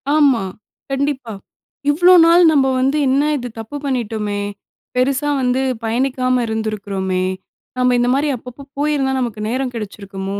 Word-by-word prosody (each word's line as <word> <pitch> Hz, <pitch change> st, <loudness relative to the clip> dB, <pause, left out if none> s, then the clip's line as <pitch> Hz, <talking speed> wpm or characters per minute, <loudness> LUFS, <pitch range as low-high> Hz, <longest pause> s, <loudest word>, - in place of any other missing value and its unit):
ஆமா, 275 Hz, -8 st, +4 dB, 0.5 s
கண்டிப்பா. 270 Hz, -4 st, -2 dB, 0.6 s
இவ்வளோ 350 Hz, +5 st, +5 dB
நாள் 340 Hz, +1 st, +6 dB
நம்ம 280 Hz, -3 st, +3 dB
வந்து 270 Hz, +3 st, +1 dB
என்ன 275 Hz, +2 st, +3 dB
இது 245 Hz, -1 st, -5 dB
தப்பு 225 Hz, +6 st, -6 dB
பண்ணிட்டோமே, 215 Hz, -5 st, -2 dB, 0.5 s
பெருசா 275 Hz, +3 st, +1 dB
வந்து 250 Hz, +1 st, +1 dB, 0.2 s
பயணிக்காம 255 Hz, +2 st, 0 dB
இருந்திருக்கிறோமே, 200 Hz, -4 st, -2 dB, 0.5 s
நம்ம 250 Hz, 0 st, +3 dB
இந்த 245 Hz, -, +2 dB
மாரி 285 Hz, +3 st, +1 dB
அப்பப்ப 250 Hz, +3 st, -11 dB
போயிருந்தா 285 Hz, -2 st, 0 dB
நமக்கு 235 Hz, -4 st, -3 dB
நேரம் 255 Hz, +2 st, -2 dB
கெடச்சிருக்குமோ, 200 Hz, -2 st, -6 dB
250 Hz, 125 wpm, -18 LUFS, 220-275 Hz, 0.6 s, நாள்